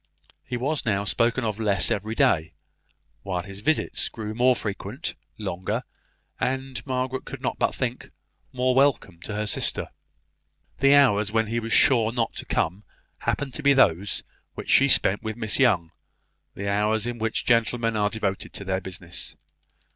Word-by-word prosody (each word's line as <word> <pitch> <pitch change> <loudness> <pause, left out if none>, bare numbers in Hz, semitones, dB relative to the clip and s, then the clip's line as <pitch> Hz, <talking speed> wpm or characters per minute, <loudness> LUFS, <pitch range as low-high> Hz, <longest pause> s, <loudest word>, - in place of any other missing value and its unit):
He 125 -1 -4
was 140 +5 -1
now 100 -3 0
spoken 115 +4 +1
of 110 -1 -2
less 100 -4 +3
every 110 +3 -2
day, 80 -7 +2 0.7
while 90 -3 -3
his 100 0 -9
visits 155 +9 +1
grew 110 -2 -6
more 125 +2 +4
frequent, 105 - -5 0.2
longer, 105 +3 -3 0.6
and, 130 0 -2
Margaret 130 0 -2
could - - -8
not - - -2
but - - +1
think, - - -3 0.4
more 130 0 +1
welcome 130 -10 +2
to 105 - -5
her 105 +1 -1
sister. 105 - -1 0.9
The 140 +1 +6
hours 105 -7 +4
when 110 0 +2
he 115 +2 -1
was 115 0 -5
sure 115 -4 +4
not 115 -2 -1
to - - -5
come 90 +6 -1 0.4
happened 140 -3 -2
to - - -4
be 140 -1 +5
those 100 -7 +2 0.3
which - - -4
she - - +6
spent 100 +2 +4
with 110 0 -5
Miss 110 0 0
Young 95 -11 +3 0.6
the 100 - -4
hours 105 +2 +1
in 120 -1 -4
which 115 0 -1
gentlemen 115 -1 +2
are 105 -1 +2
devoted 100 -3 -3
to 100 - -5
their 95 0 -1
business. 90 -2 -7
110 Hz, 165 wpm, -25 LUFS, 100-125 Hz, 0.9 s, The